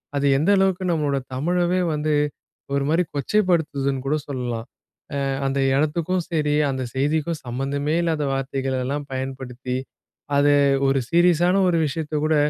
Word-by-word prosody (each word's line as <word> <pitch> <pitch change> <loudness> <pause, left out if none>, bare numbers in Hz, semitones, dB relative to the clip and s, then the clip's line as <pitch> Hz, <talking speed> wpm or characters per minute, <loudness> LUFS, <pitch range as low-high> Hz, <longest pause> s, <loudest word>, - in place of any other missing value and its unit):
அது 140 0 0
எந்த 155 +7 +1
அளவுக்கு 190 -1 +2
நம்மளோட 145 -3 0 0.2
தமிழவே 175 +5 +1
வந்து 150 0 0 0.6
ஒரு 140 0 +1
மாரி 165 +3 +3
கொச்சைப்படுத்துதுன்னு 145 -5 +1
கூட 145 +3 +1
சொல்லலாம். 125 -4 -4 0.6
அ - - 0 0.2
அந்த 135 +1 0 0.2
இடத்துக்கும் 165 +5 0
சரி, 150 -2 +1 0.2
அந்த 130 -1 -3
செய்திக்கும் 155 +3 0
சம்மந்தமே 140 +5 -2
இல்லாத 160 -3 0
வார்த்தைகளெல்லாம் 135 +1 -2
பயன்படுத்தி, 130 -1 -4 0.6
அத 145 0 +4 0.4
ஒரு 135 0 +2
சீரியஸான 175 +1 +4
ஒரு 170 - +2
விஷயத்தை 155 +1 -3
கூட 155 0 +2
145 Hz, 130 wpm, -23 LUFS, 135-165 Hz, 0.6 s, அத